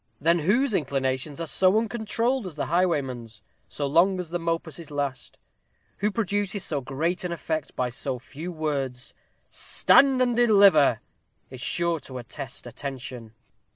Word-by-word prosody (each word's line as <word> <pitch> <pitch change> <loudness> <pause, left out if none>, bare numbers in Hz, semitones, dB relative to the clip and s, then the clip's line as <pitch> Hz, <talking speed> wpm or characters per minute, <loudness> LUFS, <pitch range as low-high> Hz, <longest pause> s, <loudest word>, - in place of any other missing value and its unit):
Then 170 +3 +3
whose 220 - +2
inclinations 135 -2 -1
are 165 - -2
so 185 +5 +3
uncontrolled 230 +1 0
as 170 - -8
the 150 - -2
highwayman's, 135 - -1 0.2
so 145 - -4
long 175 +7 +3
as 175 -3 -6
the 175 - -1
mopuses 165 -1 -3
last? 140 -4 -4 0.6
who 210 - +1
produces 205 -2 -1
so 145 -5 -1
great 155 +8 -2
an 180 - -3
effect 160 -2 -3
by 125 -1 0
so 130 +1 -2
few 150 +7 -8
words? 140 -6 -3 0.4
'STAND 270 -1 +4
AND 245 -2 +2
DELIVER!' 200 - +5 0.5
is 130 -1 -9
sure 170 +6 0
to 130 -2 -9
arrest 125 +1 -7
attention. 125 -3 -7
160 Hz, 145 wpm, -26 LUFS, 135-190 Hz, 0.6 s, DELIVER